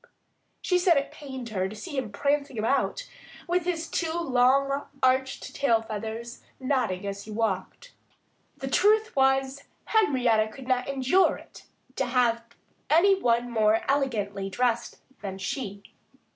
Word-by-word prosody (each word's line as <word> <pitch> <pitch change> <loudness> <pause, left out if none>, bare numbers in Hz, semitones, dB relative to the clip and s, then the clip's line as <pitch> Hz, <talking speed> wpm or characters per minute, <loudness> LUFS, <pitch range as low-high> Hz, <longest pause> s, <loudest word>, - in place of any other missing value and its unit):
She 360 -1 +2
said 350 -3 +4
it 280 +1 -1
pained 265 -5 -8
her 190 -3 -1
to 215 - -9
see 290 - -7
him 255 -6 -2
prancing 280 +3 -1
about, 275 - 0 0.4
with 350 0 0
his 335 -2 -2
two 330 -1 -2
long, 275 -1 +2 0.2
arched 260 +1 +1
tail 230 -5 +2
feathers 225 +2 -6 0.2
nodding 250 -9 -1
as 200 0 -5
he - - -12
walked. 215 - -3 0.6
The 270 - -5
truth 430 +9 +3
was, 270 +1 +2 0.2
Henrietta 250 - +3
could 260 +2 -11
not 255 0 0
endure 275 +8 +3
it - - -15 0.3
to 265 - 0
have 240 -2 +2 0.5
any 340 +7 +5
one 240 0 +1
more 220 -1 +3
elegantly 210 -8 -1
dressed 235 +3 -1 0.2
than 190 -2 -5
she. 200 0 -5
255 Hz, 140 wpm, -27 LUFS, 225-280 Hz, 0.6 s, any